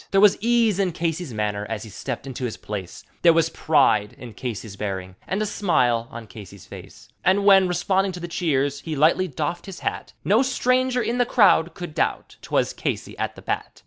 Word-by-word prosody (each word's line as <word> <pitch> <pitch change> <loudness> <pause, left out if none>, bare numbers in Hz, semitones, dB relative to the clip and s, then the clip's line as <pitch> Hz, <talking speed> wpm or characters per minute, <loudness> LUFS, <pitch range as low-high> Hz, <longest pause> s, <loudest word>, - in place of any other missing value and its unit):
There 195 - +3
was 205 -1 +6
ease 230 -3 +2
in 185 -3 +1
Casey's 165 -2 -2
manner 105 -2 -2
as 115 -2 -4
he 110 - -10
stepped 100 - -5
into 130 -1 -6
his 115 - -4
place; 100 -4 -7 0.2
There 170 -1 +6
was 165 0 +2
pride 130 -12 +2
in 120 -3 -10
Casey's 110 -3 -6
bearing 95 -2 -5
and 200 +3 -1
a - - -1
smile 120 - +1
on 115 0 -8
Casey's 100 -2 -12
face, 105 +4 -12
And 195 +2 +3
when, 195 -2 +7
responding 190 +2 +1
to 180 - -7
the 175 - -5
cheers, 145 -5 0
he 155 +1 -5
lightly 160 +6 +3
doffed 160 +4 -4
his 195 - -8
hat, - - -4
No 215 +5 +4
stranger 255 -1 +1
in 240 +2 -1
the 245 - +4
croud 190 -8 +4
could 175 -4 -7
doubt - - -2
`twas - - 0
Casey - - -3
at - - -2
the - - -13
bat. - - -4
160 Hz, 205 wpm, -23 LUFS, -, 0.2 s, when